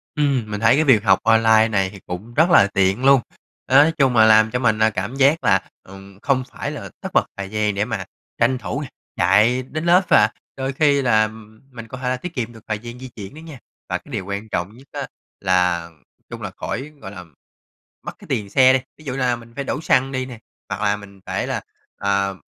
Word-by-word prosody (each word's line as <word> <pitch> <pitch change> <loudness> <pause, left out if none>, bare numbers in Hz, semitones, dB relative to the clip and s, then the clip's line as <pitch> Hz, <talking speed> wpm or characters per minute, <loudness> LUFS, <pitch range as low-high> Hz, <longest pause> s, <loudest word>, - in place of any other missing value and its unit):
Ừm, 135 -7 0
mình 105 - -3
thấy 115 +3 +4
cái 155 - +3
việc 120 -8 +4
học 95 -2 +4
online 110 0 +5
này 95 -4 0
thì 100 - -12
cũng 95 +7 -7
rất 160 +7 +3
là 130 - +6
tiện 95 +6 +1
luôn. 135 -2 +6 0.5
Đó, 130 - +1
nói 160 - +2
chung 135 -4 +3
là 110 -1 +7
làm 110 0 +5
cho 125 - -1
mình, 110 -3 +1
à, 110 0 +4
cảm 105 +5 -4
giác 140 +3 +3
là, 100 -5 +2
ừm, 95 +1 -14
không 130 +2 0
phải - - -5
là - - -7
tất - - -5
bật - - +3
thời 100 -1 -5
gian 105 -1 -1
để 100 +1 0
mà 110 -5 -4 0.3
tranh 125 +2 +2
thủ 90 -7 -4
nè - - -5 0.3
chạy 105 +8 +3
đến 155 +5 -5
lớp 175 +2 +5
và - - +5 0.3
đôi 135 0 -3
khi 140 0 +3
là 110 -4 +3 0.4
mình 115 -2 -9
có 125 - -8
thể 125 0 -2
tiết 180 +6 -7
kiệm 120 -4 -4
được 110 -2 -15
thời 110 -1 -2
gian 120 +2 -9
di 130 - -8
chuyển 100 0 -9
nữa 155 - -11
nha, 160 -5 -11 0.3
và - - 0
cái 155 - -17
điều 105 -7 -4
quan 100 +2 -5
trọng 90 +1 -3
nhất 135 +2 -17
á, - - -5 0.3
là 90 -3 +1 0.4
chung - - -8
là - - -5
khỏi 135 +5 -5
gọi 95 - -8
là, 95 -3 -9 0.8
mất - - -6
cái - - -14
tiền 100 -2 -2
xe 130 +5 +5
đi. 130 - +3 0.2
Ví 155 - -17
dụ 130 - -3
là 125 -2 0
mình 115 0 -14
phải 140 - -3
đổ 140 +3 -3
xăng 135 -3 +2
đi 130 -1 -2
nè, 125 -3 -10 0.3
hoặc - - -4
là 100 0 +1
mình 100 -1 -14
phải - - -3
là, - - -2 0.4
ờ, 100 -1 0
115 Hz, 240 wpm, -21 LUFS, 100-130 Hz, 0.8 s, là